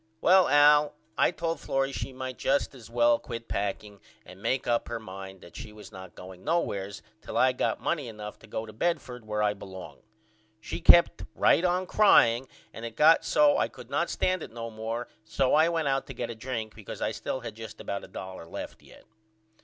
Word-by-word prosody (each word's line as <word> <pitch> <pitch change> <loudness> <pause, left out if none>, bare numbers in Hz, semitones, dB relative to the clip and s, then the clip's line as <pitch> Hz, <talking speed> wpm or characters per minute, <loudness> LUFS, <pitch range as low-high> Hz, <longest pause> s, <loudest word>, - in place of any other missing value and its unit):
Well 185 +5 +5
Al 145 +1 +5 0.2
I - - +4
told 165 -2 -3
Florrie 135 0 -1
she 135 - -4
might 130 -1 -6
just 140 +1 +1
is 120 -5 -13
well 120 0 +3
quit 115 -4 -7
packing 100 0 -3 0.3
and 95 +1 -13
make 130 +4 0
up 120 -1 0
her 120 -1 -4
mind 95 -2 -9
that 85 - -15
she 115 -3 -8
was 105 0 -13
not 95 -2 -11
going 90 0 -11
nowheres 100 - -2 0.2
till - - -5
I 130 - +5
got 125 - -1
money 150 -6 -2
enough 105 -2 -8
to - - -16
go 110 - -4
to 110 - -11
Bedford 125 -5 -2
where 105 0 -1
I 105 0 +2
belong. 95 -2 -10 0.6
She 110 - -6
kept 170 0 +6
right 170 - +4
on 180 +1 +1
crying 130 - +5 0.3
and 115 - -9
it 115 -1 -6
got 160 +5 +6
so 145 -1 +4
I - - +2
could 125 -1 -14
not 165 +5 0
stand 185 -1 0
it - - -8
no 115 0 -6
more 115 +2 -4 0.2
so 130 +4 0
I 155 +2 +5
went 165 -3 -1
out 135 0 0
to 135 - -8
get 120 0 -4
a - - -7
drink 110 -2 -5
because 110 -3 -9
I - - -1
still 110 +4 -4
had 120 - -6
just 110 0 -10
about 100 - -4
a - - -10
dollar 95 -3 -8
left - - -8
yet. - - -17
120 Hz, 210 wpm, -28 LUFS, 105-145 Hz, 0.6 s, kept